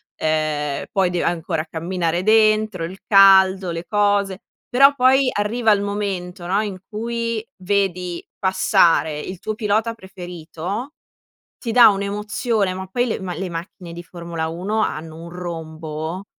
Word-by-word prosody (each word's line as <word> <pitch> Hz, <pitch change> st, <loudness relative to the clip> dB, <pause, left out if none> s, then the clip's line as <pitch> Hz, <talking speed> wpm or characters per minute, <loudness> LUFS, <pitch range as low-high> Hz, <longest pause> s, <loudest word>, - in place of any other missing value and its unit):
Ehm, 155 Hz, -2 st, -1 dB
poi 190 Hz, -2 st, +2 dB
dei 175 Hz, -1 st, -1 dB
ancora 165 Hz, -1 st, -1 dB
camminare 170 Hz, +1 st, -2 dB
dentro, 215 Hz, -3 st, +3 dB
il 185 Hz, +3 st, -9 dB
caldo, 190 Hz, -2 st, +6 dB
le 165 Hz, +1 st, -5 dB
cose. 205 Hz, -2 st, +1 dB, 0.3 s
Però 275 Hz, +3 st, +6 dB
poi 260 Hz, 0 st, +4 dB
arriva 220 Hz, +2 st, +1 dB
il 200 Hz, -1 st, +3 dB
momento, 195 Hz, -4 st, -4 dB
no, 195 Hz, +4 st, +1 dB
in 205 Hz, -3 st, -4 dB
cui 230 Hz, 0 st, -3 dB, 0.2 s
vedi 180 Hz, -3 st, -1 dB
passare 170 Hz, -4 st, +3 dB
il 185 Hz, +3 st, -7 dB
tuo 215 Hz, -, -3 dB
pilota 220 Hz, +1 st, 0 dB
preferito, 185 Hz, -, -7 dB, 0.6 s
ti 235 Hz, -, -4 dB
dà 240 Hz, 0 st, +8 dB
un'emozione, 210 Hz, +1 st, -1 dB
ma 190 Hz, 0 st, -6 dB
poi 245 Hz, +6 st, 0 dB
le 225 Hz, -, -2 dB
ma 185 Hz, -2 st, -4 dB
le 185 Hz, +2 st, -4 dB
macchine 170 Hz, +1 st, -7 dB
di 175 Hz, +1 st, -8 dB
Formula 170 Hz, -2 st, -5 dB
1 190 Hz, +7 st, -2 dB
hanno 160 Hz, -2 st, -4 dB
un 170 Hz, -, -9 dB
rombo! 165 Hz, 0 st, -6 dB
190 Hz, 145 wpm, -21 LUFS, 170-210 Hz, 0.6 s, dà